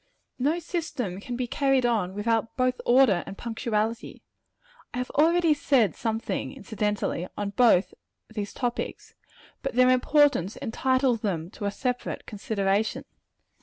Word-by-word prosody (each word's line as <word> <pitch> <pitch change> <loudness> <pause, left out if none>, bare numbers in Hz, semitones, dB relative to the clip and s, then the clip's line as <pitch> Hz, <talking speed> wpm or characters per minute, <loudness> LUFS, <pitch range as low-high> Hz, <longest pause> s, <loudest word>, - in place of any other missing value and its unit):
No 295 +6 +2
system 310 - -4
can 240 +4 -5
be 250 +1 -1
carried 270 0 +1
on 210 -6 0
without 225 +2 -1
both 255 0 +1
order 240 -8 +5
and 195 - -8
punctuality. 225 -1 -3 0.7
I - - -3
have 250 0 -3
already 330 +2 +4
said 260 - +2
something, 225 +2 -2
incidentally, 210 -8 -2
on 205 -1 -2
both 210 -4 +4 0.3
of 220 - -19
these 205 -2 -3
topics; 245 -2 -4 0.5
but 270 -3 -4
their 255 0 +6
importance 255 - +3
entitles 255 0 +1
them 175 -4 -2
to 205 - -6
a 200 - 0
separate 250 +3 -3
consideration. 205 0 -1
235 Hz, 135 wpm, -26 LUFS, 205-260 Hz, 0.7 s, their